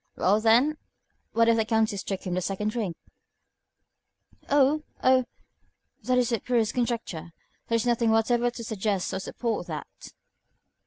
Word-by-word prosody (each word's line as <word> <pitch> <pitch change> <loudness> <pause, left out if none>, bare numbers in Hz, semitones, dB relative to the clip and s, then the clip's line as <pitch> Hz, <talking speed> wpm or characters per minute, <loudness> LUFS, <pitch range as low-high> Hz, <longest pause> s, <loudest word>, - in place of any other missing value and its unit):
"Well, 205 +4 +2
then, 245 +8 +4 0.6
what 230 0 +4
if 230 0 +4
the 225 - +3
Countess 220 -3 +1
took 195 -1 -4
him 180 - -2
the 185 - 0
second 195 +3 -2
drink?" 215 -7 -3 1.5
"Oh! 285 +2 +4 0.2
oh! 255 -1 +4 0.8
That 250 +3 +1
is 250 -1 +2
the 230 -3 0
purest 230 -2 0
conjecture. 230 -9 -3 0.3
There 230 - +1
is 230 - +1
nothing 235 -1 +2
whatever 235 +2 +2
to 235 -1 -8
suggest 210 -3 -2
or 190 - -2
support 230 +4 -3
that." - - -8
230 Hz, 150 wpm, -26 LUFS, 210-245 Hz, 1.5 s, then